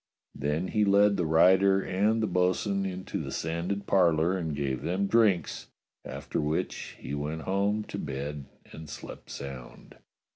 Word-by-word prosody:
Then 75 +6 -2
he 105 - +2
led 100 0 +5
the 85 -4 0
rider 95 +4 +5
and 105 +4 +1
the - - +2
bo'sun 95 +2 +1
into 95 0 -4
the - - -5
sanded 85 +5 -2
parlour 85 -2 +3
and 80 -5 -2
gave 70 -3 -2
them 90 +6 0
drinks, 105 -4 +2 0.4
after - - -4
which 75 +1 -3
he 65 - -7
went 75 +2 -3
home 100 +2 0
to 100 - -6
bed 70 0 -5 0.3
and 80 -1 -10
slept - - -9
sound. 65 -3 -9
90 Hz, 150 wpm, -28 LUFS, 75-100 Hz, 0.4 s, led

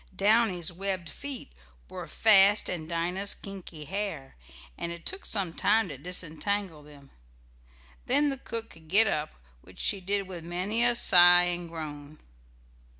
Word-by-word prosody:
Downy's 195 -4 +2
webbed 185 -2 -3
feet 280 - -5 0.4
were - - -8
fast 205 -1 +5
in 160 -3 -4
Dinah's 175 +4 -1
kinky 180 -6 -9
hair, 190 -7 -5 0.4
and 170 - -5
it 170 0 -10
took 390 +1 -5
some 190 -6 -1
time 220 +1 +2
to 145 - -7
disentangle 180 +1 -3
them. 145 -2 -17 1.0
Then 285 +3 +2
the 270 - -6
cook 230 -2 -5
could 160 -1 -17
get 205 +7 +4
up, 155 -7 -2 0.3
which 90 - -18
she 200 -2 +1
did 200 +1 -2
with 175 -3 -8
many 185 +7 -1
a 240 0 +3
sigh 175 -4 +7
and 175 -1 -2
groan. 150 -2 -8
180 Hz, 150 wpm, -28 LUFS, 165-205 Hz, 1.0 s, sigh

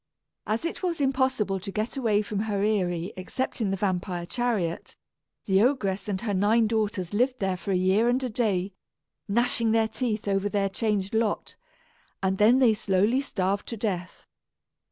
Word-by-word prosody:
As 220 +8 -1
it 335 - -3
was 350 -4 -1
impossible 260 -8 +1
to 195 +2 -7
get 215 +6 -2
away 220 -6 +1
from 205 -1 -3
her 205 -2 -1
eyrie 180 -5 0
except 235 +7 -4
in 210 - +1
the 195 - -1
vampire 180 -2 -2
chariot, 210 -6 -2 0.5
the 190 0 +3
ogress 215 -7 +1
and 195 -2 -1
her 215 -3 -2
nine 210 +4 +3
daughters 210 -4 -1
lived 250 +4 +2
there 190 -4 -1
for 195 +2 -5
a - - +2
year 190 +6 +3
and 255 +2 +1
a 255 - -1
day, 200 -4 0 0.5
gnashing 235 +1 +1
their 225 -1 +3
teeth 220 -3 -3
over 195 0 +1
their 200 -1 0
changed 200 -1 -1
lot; 220 -2 -1 0.7
and 190 0 0
then 225 +5 +6
they 250 -4 +5
slowly 210 +4 +1
starved 195 -6 -2
to 230 - -5
death. 185 -5 -4
210 Hz, 175 wpm, -26 LUFS, 195-235 Hz, 0.7 s, then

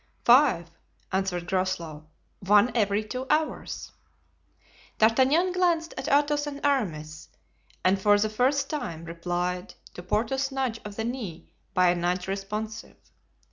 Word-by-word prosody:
"Five," 240 - +5 0.4
answered 185 -2 -1
Groslow, 170 -5 -2 0.3
"one 205 +5 +4
every 205 -2 +2
two 255 +4 -5
hours." 310 +1 -1 1.1
D'Artagnan 265 +11 +4
glanced 345 -3 +1
at 265 +1 -5
Athos 295 0 +2
and 285 -1 -5
Aramis 155 - -1 0.6
and 190 +1 +3
for 205 +1 +5
the 210 +1 +1
first 260 +6 +1
time 170 - -5
replied 175 +2 -3 0.2
to - - -8
Porthos's 240 +9 -1
nudge 260 -4 -2
of 210 -1 -8
the 220 - -3
knee 225 -9 -6 0.2
by 180 -1 +5
a - - 0
nudge 180 +1 -1
responsive. 210 +3 -5
215 Hz, 130 wpm, -27 LUFS, 180-270 Hz, 1.1 s, Five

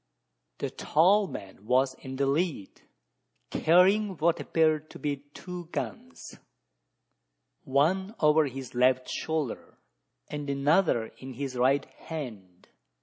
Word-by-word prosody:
The - - -3
tall 190 +6 +3
man 100 - -9
was 130 +2 +3
in 130 0 -9
the 140 +1 +1
lead, 145 - -1 0.7
carrying 190 +4 +4
what 165 +2 +2
appeared 155 -1 +1
to - - -10
be 145 -1 -2 0.2
two 180 -1 -7
guns 115 - -7 1.3
one 185 - +1
over 150 0 +4
his 130 -1 -7
left 125 +1 +3
shoulder, 155 -6 -3 0.5
and 145 -1 -5
another 140 -3 +2
in 130 0 -8
his 135 0 -4
right 135 +3 +2
hand. 110 - -9
145 Hz, 115 wpm, -28 LUFS, 130-165 Hz, 1.3 s, carrying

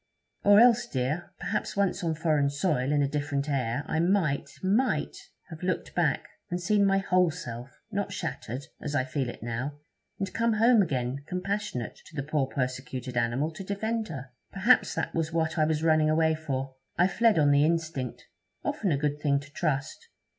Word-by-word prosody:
'Or 205 +1 +7
else, 240 0 +6
dear 130 +2 0
well, 175 - -16
perhaps - - -2
once 195 -1 +1
on 165 -2 0
foreign 150 -3 +2
soil, 140 -3 0
in 145 -1 +3
a - - +2
different 145 0 -2
air, 130 -2 -1
I 160 - -1
might 170 -5 +1
might 215 +8 +1 0.4
have 160 - -8
looked 185 0 -2
back, - - +1 0.2
and 175 0 -2
seen 200 +2 +3
my 195 0 +3
whole 185 -2 +3
self, 125 -6 -7
not 200 -1 -2
shattered, 135 - -4 0.2
as 145 -1 -3
I 130 - +3
feel 130 -1 -2
it - - -9
now, 125 +5 -3 0.4
and 195 -1 -3
come 230 0 +2
home 225 +1 +5
again 135 -5 -1
compassionate 180 - -3
to 160 - -15
the 135 - -2
poor 150 -2 0
persecuted 130 -1 -4
animal 120 +6 +1
to 160 +4 -8
defend 220 +3 -2
her. 135 -6 -7 0.2
Perhaps 210 +6 +3
that - - -2
was 165 -1 -1
what 160 0 0
I 155 - +5
was 155 0 0
running 155 -1 +4
away 160 0 +3
for. 135 -4 -4 0.2
I 180 - +5
fled 225 +2 +3
on 145 -2 +5
the 140 0 +5
instinct, 160 -6 -1 0.4
often 195 -5 0
a 145 - +2
good 150 +1 -1
thing 140 -2 +2
to 145 +1 -13
trust.' 145 -4 -2
155 Hz, 190 wpm, -28 LUFS, 135-185 Hz, 0.4 s, Or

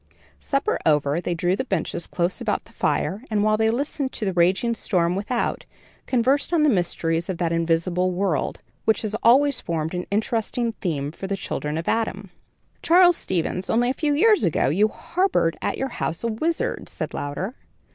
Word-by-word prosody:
Supper 275 0 -1
over, 150 +1 +2
they 175 0 -2
drew 175 +2 +1
the 230 - -2
benches 190 -7 -2
close 175 +1 -1
about - - -1
the - - -19
fire, 205 +6 -1
and 210 -2 +1
while 215 0 +3
they 220 +1 +2
listened 270 +2 -2
to 215 - -3
the 190 - 0
raging 185 +7 +2
storm 180 -6 0
without, 225 +5 -2 0.4
conversed 260 +5 +2
on 330 -3 +3
the 300 - +5
mysteries 170 -3 0
of 185 - -2
that 170 -1 0
invisible 170 +2 +1
world, 180 -5 -1 0.2
which 220 0 +2
has 215 -1 -3
always 275 +3 +4
formed 160 -1 -2
an 180 0 -3
interesting 225 +3 -1
theme 145 -6 -2
for 190 +4 -7
the 195 0 -2
children 150 -4 -3
of 165 - -4
Adam. 205 -4 -1 0.5
"Charles 355 +1 +6
Stevens, 180 - -2
only 240 +2 +2
a - - -1
few 295 0 0
years 425 +6 +4
ago, 165 -6 +2
you 200 +9 +3
harbored 335 - 0
at - - -1
your 270 - -2
house 165 -7 -3
a - - +1
wizard," 330 - -2
said - - -5
Louder. 145 - -4
200 Hz, 185 wpm, -23 LUFS, 170-245 Hz, 0.5 s, Charles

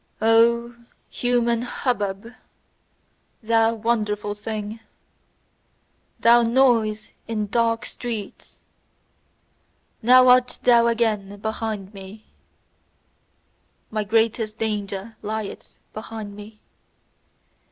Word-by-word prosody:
O 235 +2 +3 0.4
human 240 -1 +1
hubbub, 230 -3 -3 1.1
thou 225 0 +2
wonderful 210 -2 -1
thing! 215 +1 -6 1.4
Thou 235 +1 +6
noise 230 -3 +2 0.2
in 215 -2 -2
dark 230 +2 0
streets! 225 -5 -7 1.4
Now 255 +2 +6
art 250 0 +4
thou 235 -1 +5
again 215 -4 -1
behind 215 -1 -4
me: 200 +2 -11 1.7
my 215 -1 -1
greatest 220 0 0
danger 210 0 -4
lieth 215 -1 -6 0.2
behind 215 -2 -7
me! 210 +1 -12
225 Hz, 80 wpm, -23 LUFS, 210-235 Hz, 1.7 s, Thou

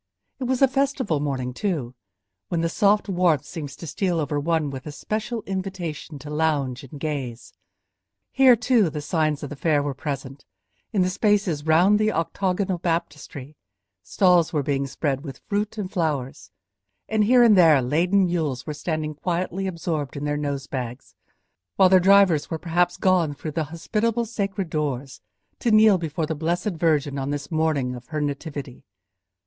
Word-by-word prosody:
It 260 - -3
was 260 +1 +1
a - - +8
festival 265 - 0
morning, 130 -3 -2
too, 145 - -2 0.5
when 170 -2 -1
the 165 - 0
soft 205 +4 +2
warmth 175 -7 +2
seems 150 -5 -7
to - - -9
steal 175 +2 -1
over 145 -1 -1
one 155 -1 0
with 135 +2 -8
a - - -5
special 215 +8 -4
invitation 185 -6 -5
to 145 +2 -10
lounge 145 -5 0
and 140 +2 -10
gaze. 135 -6 -5 0.8
Here, 265 -2 +6
too, 230 -5 +2
the 150 -1 -5
signs 155 -1 0
of 145 - -6
the - - -5
fair 145 0 +1
were 145 -1 -2
present; 135 -1 -6 0.5
in 200 -5 +2
the 180 - +1
spaces 195 -7 +1
round 180 +6 +5
the 215 0 +2
octagonal 185 +2 -1
baptistery, 150 -4 -4 0.5
stalls 175 - +3
were 150 -4 0
being 140 -1 -1
spread 135 0 -2
with 135 -4 -9
fruit 210 +1 -2
and 195 -3 -4
flowers, 150 - -2 0.6
and 215 -1 +2
here 245 +2 +6
and 225 -3 +6
there 165 -6 +6
laden 175 +10 +2
mules 155 -8 -2
were 150 - -4
standing 155 0 -3
quietly 180 +4 -2
absorbed 165 -6 -3
in 145 - -4
their 145 0 0
nose 140 -2 -3
bags, 125 -2 -6 0.6
while 190 -2 +5
their 185 0 +6
drivers 190 -4 +4
were 160 - -2
perhaps 175 +2 0
gone 175 -6 +2
through 155 +2 -6
the 160 +1 -2
hospitable 215 +9 -1
sacred 200 -5 -3
doors 135 -7 -3 0.4
to 240 - 0
kneel 215 -3 +6
before 160 -1 -2
the 160 - -2
blessed 170 +7 -1
Virgin 150 -4 0
on 135 +1 -3
this 145 0 -4
morning 155 -5 0
of 125 0 -10
her 155 -2 -3
Nativity. 145 -2 -5
160 Hz, 170 wpm, -24 LUFS, 145-190 Hz, 0.8 s, a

